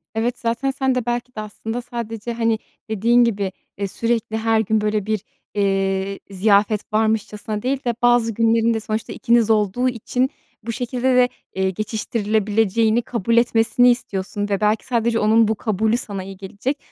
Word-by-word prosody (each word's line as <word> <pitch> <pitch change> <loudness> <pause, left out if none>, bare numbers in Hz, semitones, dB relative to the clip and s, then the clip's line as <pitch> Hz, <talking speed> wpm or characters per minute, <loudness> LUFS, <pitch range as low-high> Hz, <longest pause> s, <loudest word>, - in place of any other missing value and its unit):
Evet, 235 +2 -1
zaten 235 +4 -1
sen 265 -1 0
de 250 -2 -1
belki 240 +1 -3
de 215 - -3
aslında 225 +3 -5
sadece, 235 -2 -5
hani, 230 -1 +1 0.3
dediğin 230 +3 +4
gibi, 200 -5 0 0.3
eee, 200 0 -2
sürekli 225 +1 -1
her 225 0 +2
gün, 220 0 +1
böyle, 210 -1 0
bir, 215 -2 -1 0.3
eee, 195 -1 0
ziyafet 205 +2 +2
varmışçasına 215 -1 0
değil 265 +3 -1
de 240 - +1
bazı 240 -2 +3
günlerin 230 +1 +3
de 225 - -1
sonuçta 220 0 -4
ikiniz 235 -1 +2
olduğu 220 +3 +2
için 250 +2 -1 0.3
bu 230 - -3
şekilde 250 +2 0
de, 250 0 +5 0.3
eee, 190 0 +1
geçiştirilebileceğini 215 +1 0
kabul 235 -1 -1
etmesini 235 +1 +4
istiyorsun 205 -3 -3
ve 200 0 0
belki 210 +1 +1
sadece 235 -2 +1
onun 220 +1 +4
bu 220 - +1
kabulü 220 +1 0
sana 200 -6 -5
iyi 195 0 -9
gelecek. 200 +9 -4
225 Hz, 165 wpm, -21 LUFS, 210-235 Hz, 0.3 s, de